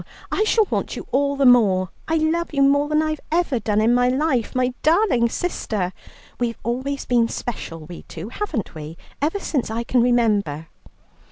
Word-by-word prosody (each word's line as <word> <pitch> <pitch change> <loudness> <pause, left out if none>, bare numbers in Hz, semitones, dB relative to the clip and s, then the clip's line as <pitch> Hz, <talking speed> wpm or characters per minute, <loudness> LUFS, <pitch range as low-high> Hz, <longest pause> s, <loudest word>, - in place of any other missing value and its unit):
I 430 - +1
shall 440 0 +3
want - - -1
you - - -7
all 280 +1 +1
the 275 -1 +2
more. 200 -7 +5 0.2
I 320 - +1
love 320 0 0
you 275 - +4
more 285 +1 +3
than 305 +1 +2
I've 310 -1 -2
ever 325 -7 +1
done 210 -1 0
in 225 +2 +3
my 245 0 +3
life, 260 -3 0
my 255 0 +1
darling 310 - +3
sister. 210 - -2 0.5
We've 235 -1 -1
always 260 +4 -2
been 240 -2 +3
special, 185 -9 -5
we 175 +1 -9
two, 170 +7 -7
haven't 285 - -4
we, 155 0 -8 0.2
ever 320 +8 0
since 280 - -2
I 225 +1 -2
can 245 +1 +2
remember?" 210 -11 +1
245 Hz, 180 wpm, -22 LUFS, 220-305 Hz, 0.5 s, more